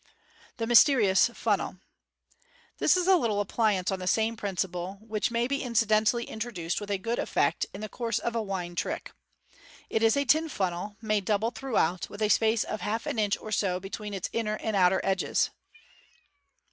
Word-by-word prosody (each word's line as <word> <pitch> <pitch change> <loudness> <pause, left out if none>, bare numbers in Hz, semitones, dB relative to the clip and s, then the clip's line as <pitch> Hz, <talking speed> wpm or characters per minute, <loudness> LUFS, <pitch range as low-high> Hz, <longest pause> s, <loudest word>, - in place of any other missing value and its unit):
The 230 - -2
Mysterious 235 -4 +5
Funnel. 210 -5 -1 0.5
— 485 +1 -33
This - - +4
is 360 - +1
a 380 0 +6
little 225 -9 0
appliance 205 -2 +1
on 190 - -2
the 185 - -5
same 220 +4 +1
principle, 190 -2 -3
which 215 -1 -2
may 235 0 0
be 275 +2 -1
incidentally 230 -1 +2
introduced 215 -7 -4
with 200 -2 -3
good 230 +1 -1
effect - - 0
in 195 - -9
the 215 - -4
course 230 +2 -2
of 235 0 -3
a 230 - +1
wine 190 -4 -4
trick. 175 - -3 0.8
It 220 - +1
is 225 +3 +4
a 280 - +1
tin 315 +4 +3
funnel, 190 - -3
made 210 -3 0
double 215 +3 +1
throughout, 185 -11 -1
with 205 +1 -5
a 210 - +2
space 220 +1 +3
of 215 - -5
half 220 +2 -2
an 225 - -2
inch 205 -1 +1
or 215 - -9
so 185 -4 0
between 200 +2 -6
its 190 - -3
inner 215 -2 -1
and 220 0 -3
outer 185 0 +4
sides. 195 -1 +1
215 Hz, 185 wpm, -28 LUFS, 195-230 Hz, 0.8 s, a